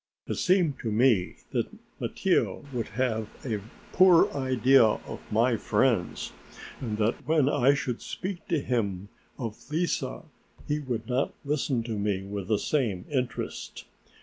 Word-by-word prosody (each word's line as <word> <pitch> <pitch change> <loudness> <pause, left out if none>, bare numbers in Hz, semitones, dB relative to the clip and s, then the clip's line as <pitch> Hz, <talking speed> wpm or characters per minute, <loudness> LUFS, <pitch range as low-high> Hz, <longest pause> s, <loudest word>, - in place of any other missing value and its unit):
It - - -2
seemed 180 -7 +2
to 115 - -3
me 110 -4 +3 0.2
that - - 0 0.3
Mattia - - 0
would 120 -2 -2
have 110 -2 -1 0.2
a 110 -5 -2 0.3
poor 180 -2 +6
idea 130 -1 +4
of 110 -1 -1
my 115 +2 +3
friends, 110 -5 +1 0.5
and 110 -5 -3
that 110 +5 0
when 155 -3 +4
I 140 -1 +4
should 125 -4 -3
speak 185 -1 -5
to 165 - +1
him 100 -7 -1 0.3
of 115 -5 -5
Lise 170 +3 0 0.6
he 150 +1 0
would 120 -6 -3
not 130 +2 0
listen 140 -4 0
to 110 -2 -3
me 100 -2 0
with 100 -1 -5
the 110 -1 +2
same 110 -9 0
interest. 130 -3 -3
125 Hz, 145 wpm, -28 LUFS, 110-140 Hz, 0.6 s, poor